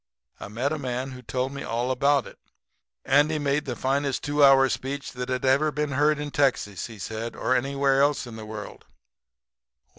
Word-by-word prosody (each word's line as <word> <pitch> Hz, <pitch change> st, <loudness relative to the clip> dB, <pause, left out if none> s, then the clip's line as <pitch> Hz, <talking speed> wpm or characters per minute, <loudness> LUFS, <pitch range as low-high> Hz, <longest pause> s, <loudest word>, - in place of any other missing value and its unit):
I -, -, -7 dB
met 120 Hz, +7 st, -2 dB
a 155 Hz, -, -2 dB
man 130 Hz, 0 st, -3 dB
who 130 Hz, -1 st, -9 dB
told 130 Hz, +2 st, -2 dB
me 140 Hz, 0 st, -7 dB
all 120 Hz, +3 st, -2 dB
about 140 Hz, 0 st, +2 dB
it. -, -, -13 dB, 0.7 s
Andy 145 Hz, +3 st, +3 dB
had 150 Hz, -, -2 dB
made 145 Hz, +1 st, 0 dB
the 125 Hz, -3 st, -3 dB
finest 135 Hz, +1 st, -1 dB
two 145 Hz, 0 st, +2 dB
hour 135 Hz, -1 st, +7 dB
speech 140 Hz, +2 st, -4 dB
that 125 Hz, 0 st, -6 dB
had 130 Hz, +1 st, -1 dB
ever 140 Hz, +4 st, +3 dB
been 150 Hz, 0 st, -2 dB
heard 150 Hz, +3 st, +2 dB
in 150 Hz, 0 st, -5 dB
Texas, 125 Hz, -10 st, 0 dB
he 115 Hz, -2 st, -11 dB
said, 110 Hz, +4 st, -5 dB
or 130 Hz, -, 0 dB
anywhere 135 Hz, +1 st, +2 dB
else 145 Hz, -1 st, +2 dB
in 120 Hz, -2 st, -9 dB
the 110 Hz, -1 st, -8 dB
world. 105 Hz, -1 st, -8 dB
135 Hz, 200 wpm, -25 LUFS, 125-145 Hz, 0.7 s, hour